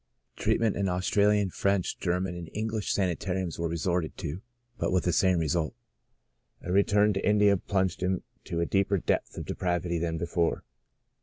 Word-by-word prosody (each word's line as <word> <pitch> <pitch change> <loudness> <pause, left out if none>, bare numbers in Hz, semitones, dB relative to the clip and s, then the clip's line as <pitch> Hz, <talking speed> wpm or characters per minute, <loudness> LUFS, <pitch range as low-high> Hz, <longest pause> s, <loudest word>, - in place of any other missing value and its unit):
Treatment 115 -2 +1
in 100 -1 0
Australian, 100 +2 +2
French, 100 -1 0
German 90 0 -1
and 85 -2 -7
English 110 0 -2
sanitariums 90 -2 -1
was 85 0 -1
resorted 85 0 -1
to, 80 +6 -5 0.4
but - - 0
with 90 0 +2
the 90 - +1
same 95 +1 +3
result. 80 0 0 0.9
A 90 - -4
return 105 +2 +4
to 95 - -2
India 105 -1 +5
plunged 95 -1 -1
him 90 0 0 0.2
to 85 - -3
a - - +2
deeper 100 +2 +2
depth - - -1
of - - -4
de - - -3
pravity 85 -1 -1
than 85 -1 -1
before. 85 +1 0
90 Hz, 165 wpm, -28 LUFS, 85-100 Hz, 0.9 s, India